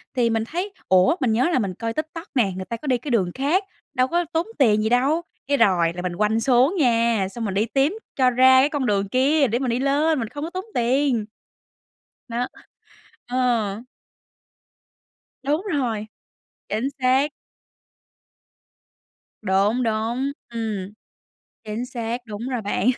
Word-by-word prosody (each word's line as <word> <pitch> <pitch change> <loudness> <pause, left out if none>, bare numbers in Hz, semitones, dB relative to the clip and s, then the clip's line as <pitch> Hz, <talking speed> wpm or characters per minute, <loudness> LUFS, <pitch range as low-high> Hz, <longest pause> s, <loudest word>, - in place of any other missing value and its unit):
thì 240 -2 +2
mình 225 -1 0
thấy: 360 - -4 0.2
"Ủa, 185 - +5
mình 245 - +2
nhớ 255 +9 +2
là - - +3
mình 195 -5 -2
coi 225 +4 -4
TikTok 315 - -5
nè, 220 -6 +3
người 185 - -5
ta 230 +4 -4
có 295 - -9
đi 255 -2 +3
cái 260 +3 -6
đường 190 -7 +2
khác, 310 +9 +1 0.3
đâu 255 -2 +2
có 345 +4 0
tốn 330 +5 0
tiền 215 -6 +4
gì 220 - +1
đâu?" 275 +7 +2 0.3
cái 285 - +2
rồi 180 -8 +3
là 180 - -5
mình 180 -1 -3
quanh 215 +3 +1
xuống 260 - +3
nha, 230 -6 +2
xong 230 +2 -4
mình 195 - -2
đi 205 +3 +1
tím 275 - +1 0.2
cho 260 -2 +4
ra 260 +1 +6
cái 285 - +3
con 285 -4 -1
đường 200 -2 0
kia 275 +4 +3
để 235 +2 0
mình 260 -2 -1
đi 235 - 0
lên 285 +3 +2
mình 225 - -2
không 290 +3 -6
có 325 - -3
tốn 370 +2 -5
tiền. 245 -2 +1 1.0
Nó 240 +2 -1 0.8
Ờ. 240 -5 +1 1.7
Đúng 295 +5 +1
rồi, 230 -7 -1 0.6
chính 230 +6 -1
xác. 260 +3 +3 2.1
Đúng, 205 +5 +2
đúng, 230 +5 -1 0.2
ừm, 215 -4 -4 0.7
chính 220 +3 -4
xác, 240 -1 -4
đúng 215 +4 -5
rồi 250 -3 -2
bạn. 205 +3 0
245 Hz, 165 wpm, -23 LUFS, 215-275 Hz, 2.1 s, ra